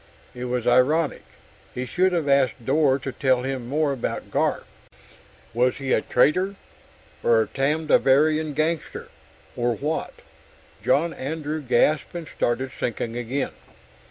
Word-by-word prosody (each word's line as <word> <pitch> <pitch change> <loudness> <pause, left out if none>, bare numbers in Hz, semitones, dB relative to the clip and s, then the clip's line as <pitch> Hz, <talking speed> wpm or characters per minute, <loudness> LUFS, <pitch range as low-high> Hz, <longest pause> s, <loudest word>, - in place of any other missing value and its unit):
It 125 -1 -6
was 125 -1 -2
ironic. 135 +6 +3 0.5
He 125 - -3
should 185 +8 +1
have 170 -4 -1
asked 135 -4 +2
Dor 140 0 +3
to 135 -1 -5
tell 130 -2 +1
him 130 -2 -4
more 150 0 +1
about 130 - -4
Garf - - 0 0.9
was 125 +2 +2
he 135 -1 -1
a - - +3
traitor, 185 +10 +2 0.7
or 115 -1 +4
a - - -8
Tamdivarian 150 +1 +2
gangster, 155 +1 -2 0.5
or 120 -1 0
what? 150 +7 -3 0.7
John 165 +3 +2
Andrew 155 +2 -4
gasped 145 +5 +1
and 170 -2 -5
started 130 +1 -1
sinking 115 0 -3
again.... 125 +3 -2
135 Hz, 130 wpm, -24 LUFS, 125-155 Hz, 0.9 s, or